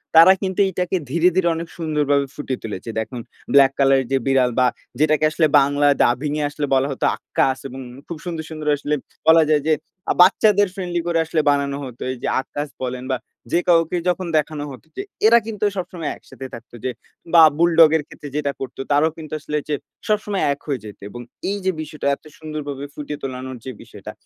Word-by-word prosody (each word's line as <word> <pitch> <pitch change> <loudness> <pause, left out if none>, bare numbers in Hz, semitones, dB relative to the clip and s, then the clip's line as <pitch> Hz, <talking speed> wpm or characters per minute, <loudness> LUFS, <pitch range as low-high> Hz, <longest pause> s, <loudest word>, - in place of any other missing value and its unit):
তারা 165 +4 +9
কিন্তু 190 -1 -2
এইটাকে 180 0 -2
ধীরে, 170 +4 +4
ধীরে, 185 -2 +2
অনেক 165 0 -5
সুন্দরভাবে 150 -3 +1
ফুটিয়ে 135 -3 -4
তুলেছে। 110 0 -6
দেখুন 120 +2 -3 0.3
ব্লাক 135 -1 +7
কালার 135 -1 +4
এর 130 - -5
যে 135 - +3
বিড়াল 130 -2 +3
বা 125 - +5 0.3
যেটাকে 155 0 +3
আসলে 155 0 +3
বাংলা 145 +1 +2 0.2
ডাবিং 125 +5 +1
এ - - 0
আসলে 145 0 -3
বলা 135 +1 +3
হত 135 - -5
আক্কাস 130 0 0
এবং 130 +1 -9 0.3
খুব 170 - -6
সুন্দর, 165 -3 -4
সুন্দর, 155 -1 -7
আসলে 145 0 -1 0.3
বলা 160 0 +7
যায় 150 -2 +3
যে, 155 - +4 0.4
আ - - +3
বাচ্চাদের 205 +2 +5
ফ্রেন্ডলি 175 -3 -3
করে 170 -1 +1
আসলে 160 0 +1
বানানো 140 -1 0
হতো। 125 -2 -9
এই 130 - -5
যে - - -1
আক্কাস 145 +2 -5 0.2
বলেন 125 0 -4
বা 130 - +1 0.3
যে 175 - +3
কাউকে 165 0 +3
যখন 180 0 -1
দেখানো 150 -1 -1
হত 130 - -11
যে - - -1 0.3
এরা 235 +1 +7
কিন্তু 210 -2 -2
সবসময় 175 -4 -4
একসাথে 135 - -11
থাকত 115 - -10
যে, 130 - 0 0.4
বা 165 - +9 0.2
বুলডগের 160 -2 +5
ক্ষেত্রে 145 - -10
যেটা 145 -2 0
করত 135 -1 -6
তারাও 150 +3 +3
কিন্তু 155 -1 -9
আসলে 150 0 -3
যে, 150 - +1 0.3
সবসময় 210 -2 0
এক 140 - -12
হয়ে 135 -7 -2
যেতে 105 - -11
এবং 120 - -8 0.3
এই 205 - -1
যে 190 - +3
বিষয়টা 150 -1 -5
এত - - -31
সুন্দরভাবে 145 -3 -6
ফুটিয়ে 150 0 -6
তোলানোর 130 -1 -5
যে 130 - -4
বিষয়টা - - -10
150 Hz, 200 wpm, -21 LUFS, 135-170 Hz, 0.4 s, তারা